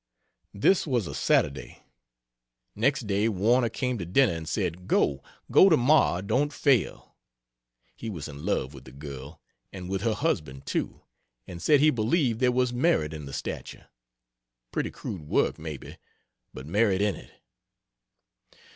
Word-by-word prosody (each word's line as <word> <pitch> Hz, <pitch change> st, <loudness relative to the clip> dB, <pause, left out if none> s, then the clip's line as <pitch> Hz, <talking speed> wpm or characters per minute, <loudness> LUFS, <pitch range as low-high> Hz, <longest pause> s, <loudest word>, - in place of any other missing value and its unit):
This 170 Hz, -, +3 dB
was 120 Hz, -7 st, 0 dB
a -, -, -6 dB
Saturday. 70 Hz, -1 st, 0 dB, 0.9 s
Next 125 Hz, +3 st, +1 dB
day 100 Hz, +2 st, +1 dB
Warner 115 Hz, +5 st, +2 dB
came 125 Hz, +1 st, -2 dB
to 90 Hz, -, -4 dB
dinner 115 Hz, +3 st, +3 dB
and 80 Hz, -1 st, -6 dB
said 90 Hz, +2 st, -3 dB
"Go! 70 Hz, -1 st, +2 dB, 0.3 s
go 195 Hz, -, +7 dB
tomorrow 140 Hz, -, +4 dB
don't 140 Hz, +9 st, 0 dB
fail." 140 Hz, -6 st, 0 dB, 0.8 s
He 115 Hz, -, -6 dB
was 85 Hz, -8 st, -6 dB
in 70 Hz, 0 st, -10 dB
love 75 Hz, -8 st, -1 dB
with 70 Hz, -, -12 dB
the 65 Hz, -, -12 dB
girl, 70 Hz, +2 st, -9 dB, 0.3 s
and 90 Hz, -2 st, -8 dB
with 95 Hz, -1 st, -1 dB
her 110 Hz, 0 st, 0 dB
husband 75 Hz, -, -2 dB
too, -, -, -3 dB, 0.4 s
and 85 Hz, -1 st, -9 dB
said 150 Hz, -3 st, +4 dB
he 155 Hz, +1 st, +6 dB
believed 120 Hz, 0 st, +1 dB
there 125 Hz, -1 st, +3 dB
was 125 Hz, 0 st, +1 dB
merit 120 Hz, -, +1 dB
in 75 Hz, -2 st, -7 dB
the -, -, -8 dB
statue. -, -, -6 dB, 0.9 s
Pretty -, -, -2 dB
crude 80 Hz, -7 st, -7 dB
work, -, -, +1 dB
maybe, 75 Hz, -4 st, -8 dB, 0.5 s
but 65 Hz, -, -9 dB
merit 100 Hz, +3 st, +2 dB
in 105 Hz, -3 st, +1 dB
it. -, -, -13 dB
100 Hz, 150 wpm, -27 LUFS, 80-125 Hz, 0.9 s, go